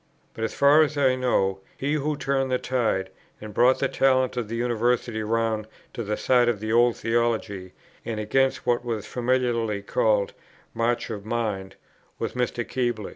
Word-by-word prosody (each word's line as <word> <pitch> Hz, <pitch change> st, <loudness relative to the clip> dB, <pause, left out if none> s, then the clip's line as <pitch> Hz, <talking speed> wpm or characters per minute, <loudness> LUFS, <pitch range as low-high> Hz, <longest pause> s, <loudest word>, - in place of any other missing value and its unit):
But, 110 Hz, -, -5 dB
as 115 Hz, -, -2 dB
far 145 Hz, +2 st, +6 dB
as 150 Hz, -1 st, +1 dB
I 135 Hz, -2 st, +4 dB
know, 100 Hz, -7 st, +1 dB, 0.2 s
he 140 Hz, +2 st, -1 dB
who 150 Hz, 0 st, -1 dB
turned 135 Hz, -1 st, 0 dB
the 130 Hz, -, +2 dB
tide, 115 Hz, -8 st, -1 dB, 0.3 s
and 105 Hz, -1 st, -9 dB
brought 125 Hz, +5 st, +4 dB
the 135 Hz, -, +1 dB
talent 130 Hz, -1 st, +2 dB
of 120 Hz, -3 st, -2 dB
the 115 Hz, -, -4 dB
University 120 Hz, -1 st, 0 dB
round 110 Hz, 0 st, -1 dB, 0.3 s
to -, -, -4 dB
the 105 Hz, 0 st, -2 dB
side 125 Hz, -2 st, +3 dB
of 115 Hz, -4 st, -1 dB
the 110 Hz, +1 st, -2 dB
old 120 Hz, 0 st, +4 dB
theology, 110 Hz, -5 st, -1 dB, 0.3 s
and 110 Hz, -2 st, -4 dB
against 135 Hz, +5 st, +1 dB
what 120 Hz, -1 st, +1 dB
was 115 Hz, -4 st, -3 dB
familiarly 120 Hz, -4 st, 0 dB
called 105 Hz, -1 st, +1 dB, 0.4 s
"march 115 Hz, +1 st, -1 dB
of 105 Hz, -2 st, -5 dB
mind," 105 Hz, -4 st, -3 dB, 0.4 s
was -, -, -3 dB
Mr. 125 Hz, -1 st, -2 dB
Keble. 120 Hz, -5 st, -2 dB
120 Hz, 175 wpm, -25 LUFS, 110-130 Hz, 0.4 s, far